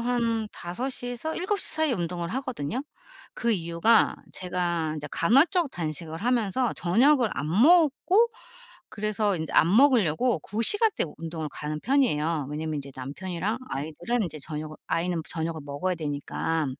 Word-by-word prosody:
한 230 -2 0
5 180 +10 -4
시에서 245 +4 -4
7 395 +3 -1
시 - - 0
사이에 315 -3 +2
운동을 175 -3 -3
하거든요. 255 - -3 0.5
그 235 -1 +1
이유가 170 +4 +3 0.2
제가 175 -3 -2
인제 150 -1 -6
간헐적 285 - +3
단식을 160 - -4
하면서 245 0 +1
저녁을 240 +7 +3
안 140 +4 -3
먹고 335 - +4 0.6
그래서 210 -1 0
인제 160 -1 -5
안 175 +5 +4
먹으려고 245 - +4
그 210 +8 -3
시간대에 415 - +4
운동을 160 -1 -5
가는 150 +2 -5
편이에요. 165 - +1
왜냐하면 155 +1 -3
인제 140 -1 -6
남편이랑 180 - -4
아이들은 160 - -2
인제 155 -3 -6
저녁을 155 +1 -6
아이는 165 +1 -1
저녁을 160 -1 -3
먹어야 145 +6 -2
되니까. 155 +1 -2
180 Hz, 330 characters per minute, -26 LUFS, 160-245 Hz, 0.6 s, 먹고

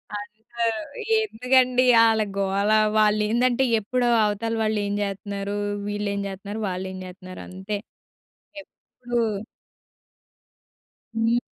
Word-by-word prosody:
అంత 210 +2 -8 0.8
ఎందుకండి 255 - +3 0.2
ఆళ్ళ 220 -1 +4 0.2
గోల 200 +2 +1 0.3
వా‌ళేందంటే 215 +4 +3 0.2
ఎప్పుడో 245 +3 0 0.2
అవతల 210 +2 -1
వాళ్ళు 215 -1 +1
ఏం 200 - -2
చేత్తున్నారు? 200 0 -3 0.3
వీళ్ళు 205 0 -2
ఏమి 200 0 -2
చేత్తున్నారు 200 +3 -6
వాళ్ళు 185 +1 -4
ఏం 190 - -7
చేత్తున్నారంతే. 185 +2 -7 0.8
ఎప్పుడూ 245 -3 -6 2.0
హ్మ్. 225 +1 +2
210 Hz, 95 wpm, -24 LUFS, 200-230 Hz, 2.0 s, ఆళ్ళ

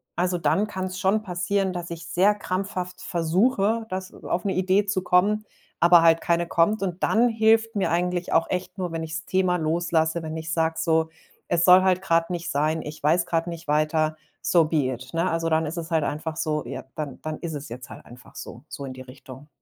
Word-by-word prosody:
Also, 180 +1 0
dann 165 +7 +1
kann's 185 -2 -5
schon 205 +3 +2
passieren, 185 +1 -1
dass 175 -1 -5
ich 170 0 -7
sehr 190 +5 +3
krampfhaft 185 -2 -4
versuche, 200 +6 +1
dass 185 0 -5
auf 180 - -4
'ne 195 - 0
Idee 190 +2 +2
zu 195 -2 -1
kommen, 210 +5 +2 0.3
aber 170 0 +7
halt 165 0 +5
keine 170 0 +1
kommt. 195 +6 +2
Und 180 -1 -3
dann 240 +2 +3
hilft 225 0 +3
mir 195 - +1
eigentlich 180 +1 -1
auch 165 - +2
echt 185 +2 -3
nur, 180 -2 -3
wenn 165 0 -3
ich's 160 +1 -5
Thema 185 -1 +1
loslasse, 165 0 0
wenn 160 0 -5
ich 160 0 -4
sage: 160 0 +1
„So, 160 -1 +1 0.4
es 170 -1 +2
soll 185 0 +8
halt 185 -1 +2
grad 165 -2 +1
nicht 175 -1 -3
sein, 155 +3 0
ich 150 +1 -8
weiß 170 +3 +3
grad 165 0 -1
nicht 165 -2 -7
weiter, 155 +1 +1 0.3
so 170 -3 +3
be 155 -4 +1
it“, 130 +5 -10
ne? 170 +3 +1
Also, 165 0 -1
dann 160 0 +2
ist 160 +4 -5
es 165 0 -5
halt 160 -2 +2
einfach 155 +2 -3
so 155 -2 -1
ja, 130 +1 -6
dann 150 -4 -5
dann 155 0 -4
ist 165 -2 -5
es 145 0 -6
jetzt 125 +1 -9
halt - - -11
einfach 125 +1 -15
so, 120 - -9
so 140 - -7
in 130 - -6
die 130 - -10
Richtung. 130 +2 -12
170 Hz, 215 wpm, -24 LUFS, 160-185 Hz, 0.4 s, soll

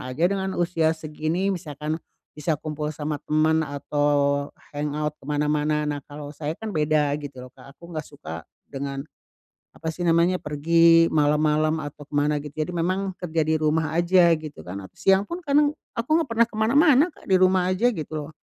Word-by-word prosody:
aja 130 +6 -2
dengan 190 -1 -2
usia 165 -2 +1
segini, 160 +5 -2
misalkan. 155 -2 -4 0.4
Bisa 155 +1 0
kumpul 150 +1 -4
sama 150 0 -3
teman 160 +1 +2
atau 145 0 +1 0.3
hangout 150 +1 -2
ke - - -20
mana-mana. 150 +1 +1
Nah, 145 -1 -2
kalau 145 0 -8
saya 150 0 -3
kan 220 +3 -7
beda, 150 -1 +2
gitu 140 -3 -8
loh, 130 - -12
Kak. 135 +1 -15
Aku 170 - -14
nggak 155 -1 -4
suka 80 - -9 0.2
dengan, 135 0 -4 0.7
apa 160 - -8
sih 175 - -8
namanya, 170 +2 +3
pergi 165 +3 +4
malam-malam 155 +1 +2
atau 145 0 -8
ke - - -17
mana, 145 +1 +2
gitu. 150 -1 -9
Jadi 180 - -7
memang, 185 +3 -1
kerja 165 -2 -3
di 160 0 +2
rumah 155 0 0
aja, 175 -1 +5
gitu 155 -2 -9
kan. 100 +2 -5
At - - -15
siang 195 +1 +4
pun, 345 +1 -4
kadang 290 +1 +4 0.3
aku 230 +5 -3
nggak 325 - 0
pernah 230 0 +3
ke 215 - -12
mana-mana, 280 +6 +5
Kak. - - -19
Di 190 - +5
rumah 185 -1 +3
aja, 225 +7 +2
gitu 155 -3 -6
loh. - - -12
155 Hz, 185 wpm, -24 LUFS, 150-175 Hz, 0.7 s, aja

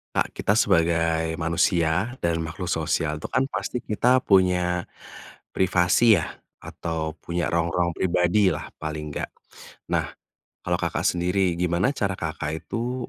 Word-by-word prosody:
Kak, - - 0
kita 105 - +1
sebagai 80 -4 +2
manusia 85 +6 +1
dan 85 -4 -1
makhluk 80 +3 -5
sosial 80 -2 -1
itu - - -5
kan 130 +2 +1
pasti 135 - -3
kita 125 +2 +2
punya 90 -2 +3 0.7
privasi 95 +4 +4
ya? - - -4 0.3
Atau 80 -1 -4
punya 85 -1 -1
ruang-ruang 85 0 0
pribadilah 95 +2 +2
paling 75 -1 -5
enggak, - - -4 0.6
nah - - 0 0.5
kalau 90 0 0
Kakak 85 -2 -1
sendiri 90 0 +1
gimana 90 +6 +1
cara 100 -5 -1
Kakak 80 -1 -3
itu 120 +1 -4
90 Hz, 130 wpm, -24 LUFS, 80-95 Hz, 0.7 s, privasi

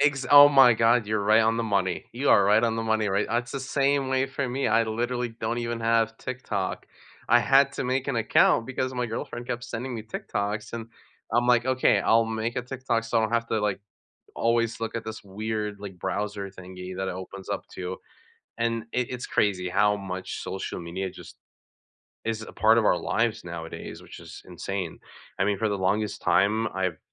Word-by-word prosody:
Ex 135 -3 +2
oh 145 0 +10
my 135 -4 +7
god, 115 0 +3
you're 110 -1 0
right 110 +2 +5
on 115 +1 +2
the 115 - 0
money, 95 -4 0
you 130 +4 0
are 100 - +6
right 105 +3 +4
on 115 -1 +1
the 115 - -1
money, 110 -1 +1
right? 100 +2 +1
That's 120 +1 -1
the 135 - -3
same 140 0 +1
way 130 0 +1
for 135 -1 -3
me, 135 +1 -1
I 115 +1 +3
literally 120 +2 -2
don't 115 +1 -3
even 120 -1 -3
have 115 0 +2
TikTok. 120 -7 -4 0.4
I 120 - +6
had 135 +1 +4
to 140 - -3
make 130 +2 -1
an 135 - 0
account 115 0 +3
because 130 0 -3
my 125 -1 -1
girlfriend 120 +2 -5
kept 120 0 -3
sending 125 +2 -5
me 110 - -5
TikToks, 105 -1 -4
and 115 -1 -5 0.5
I'm 120 +1 +3
like, 120 0 +4
"Okay, 130 0 +3
I'll 115 0 +4
make 115 +1 -3
a 125 - -1
TikTok 125 -3 -2
so 115 - +1
I - - +3
don't 110 +1 -1
have 115 0 0
to, 110 - 0
like, 105 -2 -1 0.6
always 115 0 +1
look 115 - -3
at 115 - -4
this 110 -1 -7
weird, 105 +1 -4
like, 100 -3 -8
browser 100 +2 -3
thingy 90 -1 -9
that 95 0 -2
it - - -3
opens 95 +1 -9
up - - -3
to," 90 +1 -4 0.6
and 115 -1 0
i - - +1 0.2
it's 125 - -5
crazy 90 -3 +1
how 105 +2 +3
much 95 -1 -5
social 95 - -5
media 90 +3 -4
just - - -13 0.9
is 110 -1 -2
a - - -9
part 110 +1 +4
of 115 - +2
our 90 - +3
lives 115 -4 -1
nowadays, 85 -1 -7
which - - -12
is - - -11
insane. 90 0 -5 0.4
I 95 - +2
mean, 100 0 +1
for 110 +1 +1
the 100 - -2
longest 105 +3 0
time 110 +3 +3
I've 95 -4 -1
110 Hz, 210 wpm, -26 LUFS, 100-120 Hz, 0.9 s, oh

